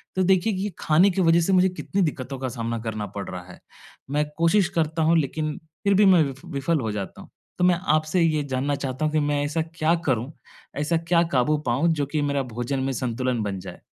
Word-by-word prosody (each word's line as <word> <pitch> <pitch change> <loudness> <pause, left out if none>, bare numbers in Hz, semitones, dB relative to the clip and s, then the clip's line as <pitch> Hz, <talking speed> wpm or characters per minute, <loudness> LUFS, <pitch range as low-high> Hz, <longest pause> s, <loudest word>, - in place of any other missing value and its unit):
तो 185 - +2
देखिए, 190 +3 +3
कि 190 - -3
ये 205 - -1
खाने 165 +6 +4
की 190 - 0
वज़ह 170 -1 +4
से 190 +3 +1
मुझे 185 0 +5
कितनी 195 +2 -3
दिक्कतों 135 -5 -2
का 130 - -2
सामना 115 -1 -3
करना 110 -2 -4
पड़ 100 - -4
रहा 90 -1 -6
है। - - -14 0.5
मैं 150 +1 +1
कोशिश 175 +3 +3
करता 160 0 0
हूँ 165 +1 +4
लेकिन, 155 +1 -1 0.3
फिर 200 -1 +3
भी 205 +1 +5
मैं 180 -4 +6
वि 140 - -3 0.2
विफल 145 +3 0
हो 110 -3 -2
जाता 105 -2 -6
हूँ। - - -14 0.3
तो - - 0
मैं 180 -1 +4 0.2
आपसे 155 +3 +1
ये 155 -3 +2
जानना 140 +3 0
चाहता 135 +1 -3
हूँ 155 - -1
कि 155 - +3
मैं 145 -1 0
ऐसा 155 +3 -1
क्या 160 +1 +2
करूँ? 130 +1 0 0.5
ऐसा 150 +3 +1
क्या 170 +1 +2
काबू 140 +4 +2
पाऊँ, 130 +8 +2
जो 145 -2 -1
कि 150 +2 -2
मेरा 140 -1 0
भोजन 120 +4 -2
में 135 0 -1
संतुलन 125 0 -1
बन 100 -2 -3
जाए? 90 -1 -10
150 Hz, 230 wpm, -24 LUFS, 130-170 Hz, 0.5 s, मैं